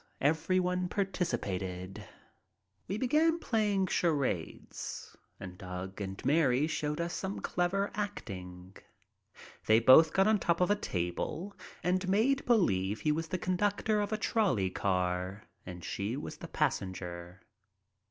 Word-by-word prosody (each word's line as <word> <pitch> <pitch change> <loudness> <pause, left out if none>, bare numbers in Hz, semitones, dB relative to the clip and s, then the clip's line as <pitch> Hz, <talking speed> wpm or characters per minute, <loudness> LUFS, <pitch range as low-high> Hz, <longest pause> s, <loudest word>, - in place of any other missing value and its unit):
Everyone 180 +4 +1
participated. 95 - -3 0.8
We 195 - -2
began 305 +7 +3
playing 210 - +1
charades, 145 - -2 0.2
and 90 -1 -9
Doug 95 +2 -6
and 95 -1 -6
Mary 145 -3 +3
showed 150 -1 -2
us 170 +1 -2
some 190 +1 -3
clever 190 +3 0
acting. 95 - -6 0.9
They 110 +1 +6
both 130 +7 +7
got 195 +3 +3
on 215 0 +4
top 170 -2 +1
of 180 +2 +3
a - - +5
table 130 - -3 0.3
and 185 +1 +1
made 250 +8 +3
believe 105 - +2
he 150 - +2
was 165 +2 -1
the 185 - -2
conductor 205 +4 +1
of 205 +1 -2
a 215 - 0
trolley 200 - +1
car 90 +1 -1 0.2
and 90 -2 -8
she 100 +9 -3
was - - -7
a - - -6
passenger. 90 -1 -3
160 Hz, 130 wpm, -31 LUFS, -, 0.9 s, both